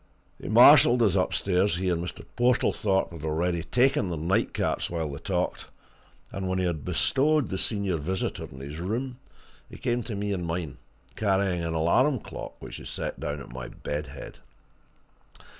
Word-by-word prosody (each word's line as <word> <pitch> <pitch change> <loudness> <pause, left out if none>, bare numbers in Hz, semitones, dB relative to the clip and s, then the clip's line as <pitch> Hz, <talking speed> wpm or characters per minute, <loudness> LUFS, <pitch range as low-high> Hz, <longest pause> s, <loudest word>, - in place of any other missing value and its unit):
He - - -6
marshalled 120 0 +7
us 105 - +3
upstairs 95 0 +1
he 95 +2 -2
and 85 -1 0
Mr. 85 - -7
Portlethorpe 110 -7 +2
had 85 -3 -9
already 85 +2 0
taken 125 0 +2
their 85 - -3
night 95 +9 +1
caps - - -1
while 80 -2 -2
they 70 - -6
talked, - - -2 0.6
and 95 -1 -3
when 95 - 0
he 95 - +1
had 85 -5 -2
bestowed 150 +1 +2
the 95 - -3
senior 100 -5 -1
visitor 90 +5 -2
in 65 - -10
his 70 +3 -7
room, 120 +8 -3 0.5
he - - -10
came 120 0 -1
to 110 - -4
me 100 0 -2
in 90 -2 -3
mine, 85 -3 -4 0.4
carrying 95 -4 +1
an 80 0 -2
alarm 125 - +3
clock - - -8
which - - -8
he - - -10
set - - -5
down 75 0 -3
at - - -11
my 65 -1 -6
bed 75 +4 -5
head. 70 +1 -10
90 Hz, 175 wpm, -27 LUFS, 80-105 Hz, 0.6 s, marshalled